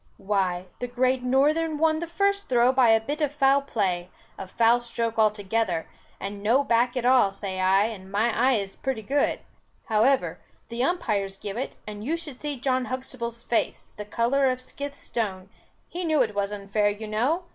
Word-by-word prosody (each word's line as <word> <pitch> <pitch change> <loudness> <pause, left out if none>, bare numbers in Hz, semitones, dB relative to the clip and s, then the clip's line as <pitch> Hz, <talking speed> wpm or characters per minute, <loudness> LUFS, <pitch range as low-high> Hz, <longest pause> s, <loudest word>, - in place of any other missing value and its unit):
"Why, 190 -3 -1
the 245 - -3
Great 255 +1 +1
Northern 300 +5 +2
won 315 0 +2
the 340 - -4
first 400 +4 0
throw 245 0 +4
by 255 -2 +4
a 225 0 +6
bit 290 +8 -4
of 295 -2 +1
foul 280 -1 +3
play, 185 -9 -1 0.3
a 190 - -7
foul 235 +4 +3
stroke 230 -1 -3
altogether, 210 -4 +1 0.3
and 200 +1 -6
no 235 +7 +3
back 245 0 +2
at 245 - -1
all, 250 -6 +5
say 195 -1 -5
I, 190 +2 +4
and 200 -4 -5
my 220 +3 +1
eyes 225 -7 +2
is - - -13
pretty 255 -4 -3
good; 280 +6 0 0.5
however, 230 +5 +2 0.3
the 235 +1 -2
umpires 210 - -1
give 200 0 -6
it, 255 +3 -4
and 210 0 -7
you 315 +8 -1
should 295 -6 -8
see 290 -3 -4
John 255 0 0
Huxtable's 240 -2 -5
face, 235 - -1
the 210 - -4
colour 250 +5 +2
of 255 - 0
a - - -15
scythe 280 +2 -7
stone; 190 -5 -4 0.4
he 355 +1 -5
knew 310 -5 +3
it 220 -3 -4
was 200 0 -1
unfair 205 +1 0
you 205 +2 -5
know. 255 - 0
235 Hz, 190 wpm, -26 LUFS, 205-270 Hz, 0.5 s, a